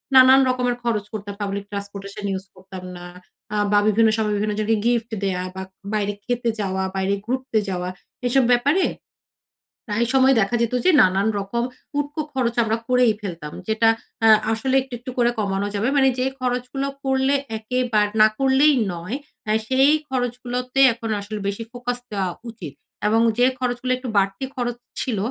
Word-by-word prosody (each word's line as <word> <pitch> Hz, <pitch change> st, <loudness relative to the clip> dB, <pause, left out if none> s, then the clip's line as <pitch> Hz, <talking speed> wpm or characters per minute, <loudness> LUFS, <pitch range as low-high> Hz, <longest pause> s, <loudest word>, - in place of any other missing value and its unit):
নানান 260 Hz, +1 st, +8 dB
রকমের 250 Hz, -1 st, 0 dB
খরচ 220 Hz, -4 st, 0 dB
করতাম, 205 Hz, -1 st, -5 dB
পাবলিক 200 Hz, 0 st, -3 dB
ট্রান্সপোর্টেশন 200 Hz, 0 st, -6 dB
ইউজ 190 Hz, 0 st, -4 dB
করতাম 185 Hz, 0 st, -10 dB
না। 175 Hz, -, -9 dB, 0.5 s
আ -, -, -1 dB, 0.2 s
বা 205 Hz, -, +5 dB
বিভিন্ন 220 Hz, +1 st, +4 dB
সময় 215 Hz, -1 st, 0 dB
বিভিন্ন 210 Hz, +1 st, -1 dB
জনকে 220 Hz, +1 st, +1 dB
গিফট 235 Hz, -1 st, +1 dB
দেয়া 185 Hz, -2 st, -1 dB
বা, 190 Hz, -, -4 dB, 0.3 s
বাইরে 205 Hz, -1 st, 0 dB
খেতে 240 Hz, -1 st, 0 dB
যাওয়া, 190 Hz, -2 st, -1 dB
বাইরে 190 Hz, +1 st, 0 dB
ঘুরতে 255 Hz, -1 st, -1 dB
যাওয়া। 180 Hz, -1 st, -2 dB, 0.4 s
এসব 265 Hz, +2 st, +3 dB
ব্যাপারে 285 Hz, +10 st, +3 dB, 1.0 s
প্রায় 225 Hz, +2 st, 0 dB
সময় 265 Hz, 0 st, +5 dB
দেখা 215 Hz, +3 st, +1 dB
যেত 235 Hz, +1 st, 0 dB
যে -, -, +6 dB
নানান 190 Hz, +2 st, +3 dB
রকম 200 Hz, +4 st, -2 dB, 0.3 s
উটকো 290 Hz, +2 st, -2 dB
খরচ 240 Hz, -3 st, 0 dB
আমরা 225 Hz, 0 st, 0 dB
করেই 250 Hz, -3 st, +4 dB
ফেলতাম। 170 Hz, -7 st, -6 dB
যেটা 220 Hz, +1 st, +3 dB, 0.4 s
আ -, -, +7 dB, 0.2 s
আসলে 260 Hz, +4 st, 0 dB
একটু, 260 Hz, -1 st, -11 dB
একটু 255 Hz, +1 st, -7 dB
করে 240 Hz, -1 st, +4 dB
কমানো 200 Hz, -1 st, -1 dB
যাবে। 210 Hz, +4 st, 0 dB
মানে 265 Hz, -1 st, +5 dB
যে 255 Hz, -, +1 dB
খরচগুলো 250 Hz, +2 st, -2 dB, 0.2 s
করলে 265 Hz, +1 st, +2 dB, 0.2 s
একেবার 220 Hz, -1 st, +1 dB
না 215 Hz, -, +9 dB
করলেই 270 Hz, +3 st, +5 dB, 0.2 s
নয়, 175 Hz, +8 st, -5 dB, 0.5 s
সেই 265 Hz, +3 st, +4 dB, 0.2 s
খরচগুলোতে 250 Hz, 0 st, -2 dB
এখন 230 Hz, -1 st, -6 dB
আসলে 205 Hz, +1 st, -6 dB
বেশি 200 Hz, +3 st, -3 dB
ফোকাস 245 Hz, 0 st, -3 dB
দেওয়া 195 Hz, -3 st, -1 dB, 0.2 s
উচিত 180 Hz, -, -9 dB, 0.3 s
এবং 225 Hz, +2 st, +3 dB, 0.2 s
যে 245 Hz, -, +5 dB
খরচগুলো 250 Hz, 0 st, -1 dB
একটু 255 Hz, -1 st, -6 dB
বাড়তি 195 Hz, +5 st, +1 dB
খরচ 240 Hz, -2 st, -2 dB, 0.2 s
ছিল, 240 Hz, -5 st, -2 dB
230 Hz, 165 wpm, -22 LUFS, 200-255 Hz, 1.0 s, না